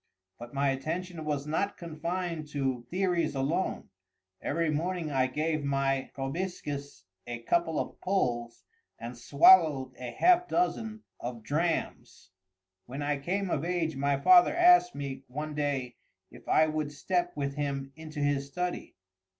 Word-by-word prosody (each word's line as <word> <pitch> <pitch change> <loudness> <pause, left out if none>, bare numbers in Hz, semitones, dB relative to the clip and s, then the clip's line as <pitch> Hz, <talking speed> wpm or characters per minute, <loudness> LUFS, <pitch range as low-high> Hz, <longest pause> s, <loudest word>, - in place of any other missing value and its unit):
But 120 0 -9
my 140 0 +1
attention 160 +5 -3
was 145 -2 -2
not 180 +7 -1
confined 170 0 -4
to 130 -4 -2
theories 175 -5 0
alone. 140 +7 -1 0.5
Every 165 +1 0
morning 165 +1 -2
I 130 -2 +2
gave 155 +3 -1
my 135 -1 0
proboscis 140 - -4 0.2
a 120 -1 -6
couple 165 +4 +1
of - - -5
pulls 120 -11 -1 0.3
and 120 +2 -7
swallowed 140 +1 +5
a 125 -1 -5
half 355 - +4
dozen 225 -13 -1 0.2
of 120 -2 -6
drams. 155 - -2 0.6
When 135 +4 -5
I 145 -1 0
came 185 +5 -2
of 145 - 0
age 170 -3 -1
my 140 0 +1
father 355 - +6
asked 355 0 +6
me, 140 -2 -5
one 150 +4 -5
day, 140 -4 -2 0.3
if - - -15
I 155 - +5
would 155 -1 -2
step 175 +4 -1
with 140 -1 -2
him 140 -2 -3
into 155 -1 -7
his 145 -1 0
study. 180 +5 -4
150 Hz, 140 wpm, -29 LUFS, 135-175 Hz, 0.6 s, father